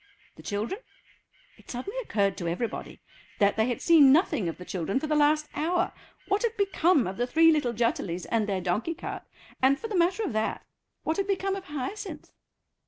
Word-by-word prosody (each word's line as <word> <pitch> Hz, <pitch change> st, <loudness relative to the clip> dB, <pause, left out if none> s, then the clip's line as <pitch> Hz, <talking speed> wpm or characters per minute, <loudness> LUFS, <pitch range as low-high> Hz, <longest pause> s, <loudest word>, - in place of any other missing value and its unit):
The -, -, -13 dB
children? 215 Hz, -, -3 dB, 0.8 s
It -, -, -20 dB
suddenly 265 Hz, -, -5 dB
occurred 200 Hz, -, 0 dB
to 170 Hz, -, -4 dB
everybody 200 Hz, +8 st, -4 dB, 0.4 s
that 200 Hz, 0 st, +3 dB
they 220 Hz, +1 st, +2 dB
had 245 Hz, -, -3 dB
seen 305 Hz, -6 st, +7 dB
nothing 270 Hz, -, +3 dB
of 165 Hz, -, -6 dB
the 180 Hz, -, -10 dB
children 185 Hz, +7 st, -2 dB
for 310 Hz, -, -4 dB
the 305 Hz, -, -1 dB
last 300 Hz, +1 st, +3 dB
hour. 350 Hz, +4 st, 0 dB, 0.3 s
What 400 Hz, +1 st, +1 dB
had 465 Hz, -2 st, -1 dB
become 365 Hz, -6 st, +3 dB
of 190 Hz, +1 st, -5 dB
the 245 Hz, +1 st, 0 dB
three 325 Hz, +4 st, +5 dB
little 295 Hz, -6 st, +1 dB
Jutterlys 210 Hz, -7 st, -1 dB
and 220 Hz, -2 st, +1 dB
their 190 Hz, -2 st, -1 dB
donkey 210 Hz, -, -1 dB
cart, -, -, -6 dB, 0.4 s
and, 265 Hz, +1 st, +4 dB
for 455 Hz, -, -5 dB
the 420 Hz, -, -3 dB
matter 360 Hz, +5 st, +2 dB
of 360 Hz, -, -2 dB
that, 220 Hz, 0 st, -2 dB, 0.4 s
what 315 Hz, -, -1 dB
had 395 Hz, 0 st, 0 dB
become 390 Hz, 0 st, 0 dB
of 390 Hz, -1 st, -7 dB
Hyacinth. 300 Hz, +8 st, -6 dB
290 Hz, 195 wpm, -27 LUFS, 215-360 Hz, 0.8 s, seen